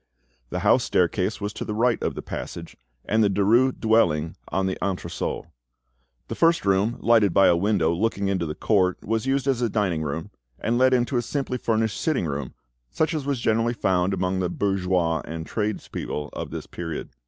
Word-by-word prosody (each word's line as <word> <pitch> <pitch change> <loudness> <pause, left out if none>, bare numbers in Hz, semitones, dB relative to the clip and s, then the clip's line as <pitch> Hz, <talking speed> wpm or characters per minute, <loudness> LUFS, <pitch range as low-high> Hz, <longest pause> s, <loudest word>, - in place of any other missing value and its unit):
The - - -3
house - - +4
staircase 95 +4 +1
was 105 0 -4
to - - -5
the 105 - -4
right 120 +1 +2
of - - -2
the - - -6
passage; 85 -1 -7 0.3
and 110 +1 +2
the 105 - +3
Derues' 110 +7 +3
dwelling 85 -9 +2
on 95 - -1
the 95 - -1
entresol. 90 -3 -3 0.8
The - - -4
first 165 -4 +3
room, 100 +5 +2
lighted 110 -6 +4
by 95 - +6
a - - +5
window 90 -3 +2
looking 100 +1 0
into 95 -4 0
the 75 - -4
court, 95 -4 +2
was 115 +3 -1
used 135 0 +1
as 130 -3 +1
a 120 - +1
dining 95 -7 0
room, 80 +1 -4 0.3
and 120 +2 0
led 130 0 +5
into 125 +1 0
a - - +2
simply 130 +1 -3
furnished 110 -2 0
sitting 155 - 0
room, 70 -4 -4 0.3
such 160 - 0
as 150 -3 -3
was 140 -3 0
generally 115 +1 +1
found 95 -3 +1
among 95 0 -1
the 90 -1 0
bourgeois 90 -4 0
and 80 0 -6
tradespeople 105 -8 -3
of - - -5
this - - -6
period. 80 -3 -6
100 Hz, 190 wpm, -24 LUFS, 90-115 Hz, 0.8 s, by